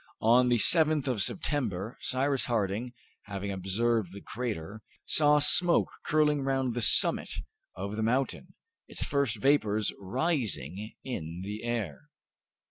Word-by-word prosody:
On 125 Hz, +3 st, +5 dB
the 120 Hz, -, +3 dB
7th 155 Hz, +2 st, +5 dB
of 125 Hz, -6 st, 0 dB
September, 115 Hz, -, -1 dB
Cyrus 135 Hz, +1 st, 0 dB
Harding, 115 Hz, +1 st, -2 dB, 0.3 s
having 100 Hz, -1 st, -5 dB
observed 100 Hz, +2 st, -1 dB
the 100 Hz, -, -8 dB
crater, 110 Hz, -4 st, -5 dB, 0.2 s
saw 150 Hz, -1 st, +3 dB
smoke 170 Hz, +4 st, +4 dB
curling 150 Hz, -1 st, +2 dB
round 135 Hz, -2 st, -1 dB
the 120 Hz, -, -3 dB
summit -, -, +3 dB, 0.4 s
of 100 Hz, +3 st, -5 dB
the -, -, -1 dB
mountain, 125 Hz, +5 st, -1 dB, 0.3 s
its -, -, -4 dB
first 140 Hz, -6 st, 0 dB
vapors 110 Hz, -6 st, +1 dB
rising 105 Hz, -, -2 dB
in 85 Hz, -9 st, -6 dB
the 105 Hz, +2 st, -6 dB
air. 110 Hz, -, -4 dB
115 Hz, 125 wpm, -29 LUFS, 100-135 Hz, 0.4 s, On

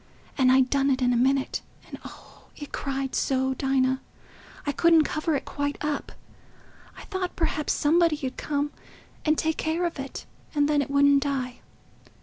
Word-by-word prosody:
And 255 Hz, -2 st, +4 dB
I'd 260 Hz, 0 st, +4 dB
done 275 Hz, 0 st, +2 dB
it 265 Hz, -1 st, +2 dB
in 245 Hz, 0 st, +3 dB
a -, -, +2 dB
minute; 265 Hz, +3 st, +1 dB, 0.3 s
and, -, -, -9 dB
oh, -, -, -13 dB
it 290 Hz, -, -8 dB
cried 270 Hz, -1 st, -3 dB
so, 265 Hz, 0 st, +1 dB
Dinah—I 265 Hz, +2 st, -3 dB
couldn't 330 Hz, +2 st, +5 dB
cover 310 Hz, +1 st, -1 dB
it 275 Hz, -, -3 dB
quite 285 Hz, 0 st, -3 dB
up—I 295 Hz, -1 st, -8 dB
thought 375 Hz, -2 st, -4 dB
perhaps 310 Hz, -3 st, 0 dB
somebody 325 Hz, 0 st, +3 dB
'ud 260 Hz, -, -4 dB
come 290 Hz, 0 st, -2 dB, 0.5 s
and 310 Hz, 0 st, +3 dB
take 320 Hz, 0 st, 0 dB
care 325 Hz, +3 st, 0 dB
of 335 Hz, -4 st, -3 dB
it, 270 Hz, 0 st, -6 dB, 0.3 s
and 290 Hz, -1 st, +3 dB
then 295 Hz, -1 st, +2 dB
it 280 Hz, -, -4 dB
wouldn't 280 Hz, 0 st, +5 dB
die. 265 Hz, -3 st, -2 dB
285 Hz, 160 wpm, -26 LUFS, 265-305 Hz, 0.5 s, couldn't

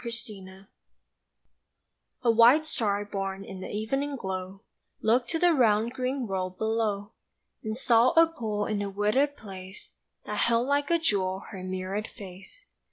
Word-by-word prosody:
THE 235 Hz, -, -3 dB
STAR 195 Hz, -4 st, -8 dB, 1.6 s
A 235 Hz, -, +5 dB
WHITE 240 Hz, +7 st, +6 dB
star 205 Hz, -8 st, -1 dB
born 195 Hz, -1 st, -4 dB
in 190 Hz, -1 st, -8 dB
the -, -, -6 dB
evening 270 Hz, +7 st, -2 dB
glow 190 Hz, -2 st, -5 dB, 0.4 s
Looked 240 Hz, +3 st, +2 dB
to 330 Hz, -, 0 dB
the 350 Hz, +1 st, +4 dB
round 230 Hz, -3 st, +3 dB
green 255 Hz, 0 st, -2 dB
world 185 Hz, -2 st, -3 dB
below, 220 Hz, -2 st, -1 dB, 0.5 s
And 220 Hz, 0 st, -3 dB
saw 240 Hz, -1 st, +4 dB
a 330 Hz, 0 st, +7 dB
pool 220 Hz, -10 st, -3 dB
in 210 Hz, -2 st, -1 dB
a 200 Hz, -, -2 dB
wooded 215 Hz, +9 st, +1 dB
place 190 Hz, -2 st, -10 dB, 0.3 s
That -, -, -3 dB
held 235 Hz, +1 st, +2 dB
like 285 Hz, 0 st, +1 dB
a 340 Hz, -, +4 dB
jewel 195 Hz, -, 0 dB
her 190 Hz, -3 st, -7 dB
mirrored 185 Hz, +3 st, -3 dB
face. 195 Hz, -, -12 dB
215 Hz, 155 wpm, -28 LUFS, 195-250 Hz, 1.6 s, a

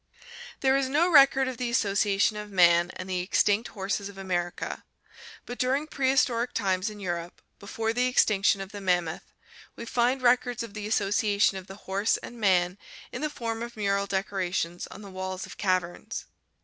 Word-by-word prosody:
There 265 Hz, 0 st, +3 dB
is 275 Hz, -1 st, +1 dB
no 325 Hz, +6 st, +2 dB
record 270 Hz, -3 st, +6 dB
of 255 Hz, -2 st, -4 dB
the 250 Hz, -1 st, -2 dB
association 205 Hz, -1 st, +2 dB
of 210 Hz, 0 st, -6 dB
man 175 Hz, -2 st, +4 dB
and 185 Hz, -, -7 dB
the 185 Hz, -1 st, -1 dB
extinct 205 Hz, +4 st, +2 dB
horses 200 Hz, 0 st, -3 dB
of 200 Hz, -, -13 dB
America, 175 Hz, -2 st, -3 dB, 0.6 s
but 245 Hz, -, -7 dB
during 265 Hz, +4 st, +1 dB
prehistoric 260 Hz, -4 st, +1 dB
times 190 Hz, +1 st, 0 dB
in 210 Hz, -1 st, -10 dB
Europe, 175 Hz, -2 st, -4 dB, 0.2 s
before 225 Hz, +2 st, -3 dB
the 250 Hz, +1 st, +1 dB
extinction 200 Hz, -5 st, +3 dB
of 195 Hz, +1 st, -7 dB
the 205 Hz, -1 st, -8 dB
mammoth, 175 Hz, -3 st, -1 dB, 0.4 s
we 235 Hz, -, -7 dB
find 245 Hz, +3 st, +1 dB
records 245 Hz, -1 st, +2 dB
of 225 Hz, -3 st, -9 dB
the 210 Hz, -1 st, -5 dB
association 205 Hz, -1 st, +2 dB
of 185 Hz, -, -14 dB
the 195 Hz, -, -9 dB
horse 200 Hz, +3 st, +1 dB
and 240 Hz, -, -10 dB
man 180 Hz, -1 st, +2 dB, 0.3 s
in -, -, -6 dB
the 305 Hz, -, -1 dB
form 230 Hz, -5 st, -4 dB
of 235 Hz, -1 st, -7 dB
mural 200 Hz, -1 st, 0 dB
decorations 185 Hz, -3 st, -2 dB
on 210 Hz, -, -11 dB
the 200 Hz, -, -10 dB
walls 185 Hz, 0 st, -5 dB
of -, -, -12 dB
caverns. 185 Hz, -3 st, -2 dB
205 Hz, 175 wpm, -27 LUFS, 190-240 Hz, 0.6 s, record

